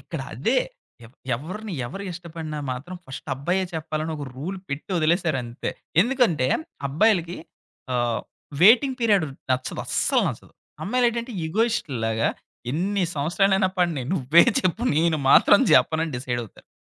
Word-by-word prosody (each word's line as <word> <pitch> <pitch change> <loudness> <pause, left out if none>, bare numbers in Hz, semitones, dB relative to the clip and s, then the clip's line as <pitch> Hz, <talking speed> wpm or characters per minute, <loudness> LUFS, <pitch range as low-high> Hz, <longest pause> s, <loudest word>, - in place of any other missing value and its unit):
ఇక్కడ - - -6
అదే, - - +1 0.5
ఎవ్ 120 - -21 0.2
ఎవరిని 190 - -7
ఎవరు 195 +11 -7
ఇష్టపడినా 165 -3 -7
మాత్రం 145 +9 -7
ఫస్ట్ 135 +3 -9
అబ్బాయే 175 +8 -1
చెప్పాలని, 155 0 -3
ఒక 145 - -5
రూల్ 180 +8 -5
పెట్టొదిలేసారంతే. 155 - -1 0.3
ఎందుకంటే 230 - +1 0.4
అబ్బాయిలకి 175 +2 +2 0.6
ఆహ్, 120 -1 0 0.4
వెయిటింగ్ 255 +6 +6
పీరియడ్ 205 -8 +3 0.2
నచ్చదు 130 0 -1
అస్సలు - - +1
నచ్చదు. - - -8 0.3
అమ్మాయిలేంటంటే 240 +2 0
ఇగోయిస్టుల్లాగా 140 - 0 0.4
ఎన్ని 190 +6 0
సంవత్సరాలైనా 190 +6 +2
పడిని, 170 -7 +1
నువ్వే 160 -1 +5 0.2
చెప్పు, 185 +5 -1
నేను 160 0 +3
మాత్రం - - +7
చెప్పనని 160 0 +3
డిసైడవుతరు. 120 -3 -5
165 Hz, 115 wpm, -24 LUFS, 140-195 Hz, 0.6 s, మాత్రం